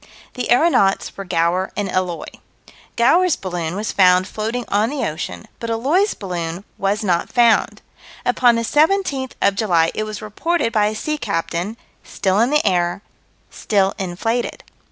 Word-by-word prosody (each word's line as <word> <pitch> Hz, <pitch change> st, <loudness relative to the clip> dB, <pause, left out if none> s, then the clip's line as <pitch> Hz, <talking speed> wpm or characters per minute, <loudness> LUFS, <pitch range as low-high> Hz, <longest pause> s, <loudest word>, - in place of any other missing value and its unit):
The 250 Hz, -, -4 dB
aeronauts 245 Hz, -, +3 dB
were 195 Hz, -, -7 dB
Gower 175 Hz, +2 st, 0 dB
and 205 Hz, -1 st, -1 dB
Eloy. 185 Hz, -2 st, -2 dB, 0.7 s
Gower's 330 Hz, +8 st, +4 dB
balloon 175 Hz, -3 st, -4 dB
was 210 Hz, +2 st, -3 dB
found 185 Hz, -1 st, +4 dB
floating 225 Hz, +4 st, -3 dB
on 210 Hz, +3 st, +1 dB
the 280 Hz, -, -2 dB
ocean, 90 Hz, -, -6 dB
but 230 Hz, -, -5 dB
Eloy's 290 Hz, -, +1 dB
balloon 175 Hz, -2 st, -5 dB, 0.2 s
was 200 Hz, +3 st, 0 dB
not 175 Hz, -4 st, 0 dB
found. 235 Hz, -3 st, +3 dB, 0.4 s
Upon 245 Hz, -1 st, +4 dB
the 230 Hz, -, -1 dB
17th 295 Hz, -, +1 dB
of 200 Hz, -, +4 dB
July 175 Hz, -6 st, +2 dB
it 215 Hz, -, -2 dB
was 215 Hz, -1 st, -6 dB
reported 230 Hz, +5 st, -1 dB
by 210 Hz, -2 st, +3 dB
a 215 Hz, -, -3 dB
sea 305 Hz, +7 st, -3 dB
captain: 190 Hz, 0 st, -3 dB, 0.3 s
still 190 Hz, +1 st, 0 dB
in 235 Hz, +3 st, +3 dB
the 300 Hz, -2 st, +2 dB
air; 175 Hz, 0 st, +1 dB, 0.5 s
still 195 Hz, -2 st, +1 dB
inflated. 210 Hz, +6 st, -2 dB
210 Hz, 155 wpm, -20 LUFS, 185-245 Hz, 0.7 s, Gower's